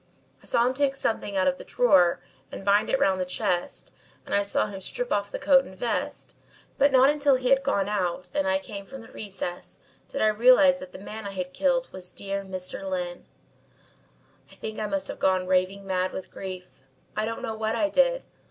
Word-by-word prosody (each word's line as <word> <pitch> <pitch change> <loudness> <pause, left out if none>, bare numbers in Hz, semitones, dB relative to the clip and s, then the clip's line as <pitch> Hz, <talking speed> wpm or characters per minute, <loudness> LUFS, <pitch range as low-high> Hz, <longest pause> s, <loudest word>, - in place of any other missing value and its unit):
I - - -16
saw 235 - +3
him 255 - +1
take 275 0 +1
something 215 -6 -2
out 185 - +2
of 275 0 +1
the - - -8
drawer 180 - +3 0.3
and 195 - -8
bind 205 +1 +3
it 270 - +2
round 190 -1 +2
the - - +2
chest 180 -1 -3 0.3
and - - -6
I 200 - +4
saw 200 - 0
him 200 -2 -7
strip - - -4
off 200 0 0
the - - -4
coat 275 -1 +5
and 190 -6 -12
vest, 235 +4 -3 0.5
but 280 +1 +5
not 265 +2 +6
until 290 -2 +3
he 255 -1 -1
had 270 0 +5
gone 200 -6 0
out 185 -4 -2
and 290 0 0
I 285 0 +3
came 205 -8 -8
from 270 -2 -9
the 225 - -14
recess, 190 -4 -6 0.3
did 275 - -2
I 215 - +5
realise 255 +5 +6
that 275 0 -10
the - - -9
man 210 +2 -7
I 200 - -6
had 185 -1 -4
killed 260 -2 +1
was 180 -1 -9
dear 200 0 -4
Mr. 185 -1 -6
Lyne. 180 -1 -4 1.2
"I - - -15
think 220 0 -6
I 215 - -1
must 195 -2 -2
have - - -6
gone 185 -1 +2
raving 185 +2 +1
mad 185 -1 -1
with 190 - -7
grief. 185 -6 -8 0.3
I 215 - 0
don't 230 - -5
know 220 - -2
what 220 +1 -1
I 300 - +2
did. - - +2
210 Hz, 215 wpm, -26 LUFS, 190-270 Hz, 1.2 s, not